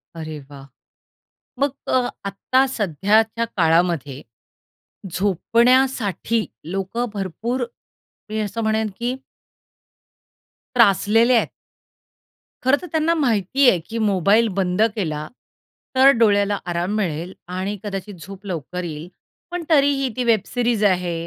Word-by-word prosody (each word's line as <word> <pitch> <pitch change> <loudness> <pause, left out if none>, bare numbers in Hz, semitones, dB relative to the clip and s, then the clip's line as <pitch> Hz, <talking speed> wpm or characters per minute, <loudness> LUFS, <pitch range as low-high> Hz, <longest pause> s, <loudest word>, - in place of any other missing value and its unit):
अरे 155 -2 -6
वाह! 140 -1 -11 0.9
मग 280 +1 +2 0.2
अ, 255 -1 +2 0.2
आत्ता 255 +7 +1
सध्याच्या 215 - +1
काळामध्ये 165 -5 +1 0.9
झोपण्यासाठी 230 +3 +1 0.3
लोकं 195 +5 -2
भरपूर, 220 +6 -3 0.7
मी 215 0 -2
असं 210 +1 -3
म्हणेन, 220 0 0
की 245 +2 -1 1.6
त्रासलेले 225 +2 +4
आहेत. 230 - +2 1.1
खरं 260 +3 +4
तर 360 - -7
त्यांना 320 +1 +2
माहिती 255 - +3
आहे, 180 - +2
की 220 +8 -7
मोबाईल 210 +1 +3
बंद 185 0 0
केला 155 -7 -3 0.7
तर 265 +1 +7
डोळ्याला 205 -2 +3
आराम 175 +4 -1
मिळेल 175 -3 -2 0.2
आणि 195 +2 -3
कदाचित 205 0 -5
झोप 195 +1 -11
लवकर 180 0 -5
येईल. 160 -1 -6 0.4
पण 355 -1 -3
तरीही 280 -3 +3
ती 250 - -1
वेब 230 -2 +3
सीरीज 240 -3 0
आहे 180 -3 +1
210 Hz, 115 wpm, -21 LUFS, 180-240 Hz, 1.6 s, तर